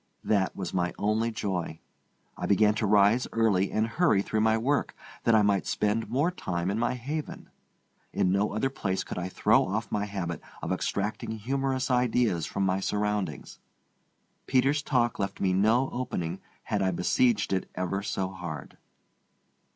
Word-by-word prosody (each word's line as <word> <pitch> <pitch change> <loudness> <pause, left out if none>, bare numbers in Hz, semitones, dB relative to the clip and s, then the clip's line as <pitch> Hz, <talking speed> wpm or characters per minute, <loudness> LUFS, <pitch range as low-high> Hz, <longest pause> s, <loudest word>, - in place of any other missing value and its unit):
That 100 -3 +1
was 95 -3 -5
my 90 -1 0
only 110 +2 +1
joy. 95 -7 -3 0.6
I - - -4
began 105 +1 +4
to 110 0 -1
rise 105 +4 +4
early 105 -4 +2
and 110 - +1
hurry 115 - +2
through 110 +1 -1
my 110 0 +3
work, 140 +6 0 0.3
that 115 - +5
I 110 - +5
might 100 -2 +1
spend 105 +2 0
more 145 +8 +1
time 90 - -2
in 105 - -1
my 120 - 0
haven. 145 +5 -5 0.6
In 90 - +1
no 100 +2 +1
other 120 +6 -1
place 95 -7 -2
could - - -5
I 90 +1 -3
throw - - +3
off 105 +2 -3
my 105 0 0
habit 90 -5 -4 0.2
of - - -2
extracting 105 +2 -2
humorous 135 +3 -1
ideas 120 -8 +2
from 100 - -1
my 95 0 +1
surroundings. 105 0 -2 0.9
Peter's 135 +3 +3
talk 120 -5 +1
left 100 0 -3
me 95 -1 +1
no 110 +7 +3
opening 90 -9 -3 0.2
had 105 - -1
I 95 - +2
besieged 105 +4 +2
it 95 - -1
ever 90 +2 -2
so 95 -2 -2
hard. 85 -7 -8
105 Hz, 165 wpm, -28 LUFS, 95-120 Hz, 0.9 s, that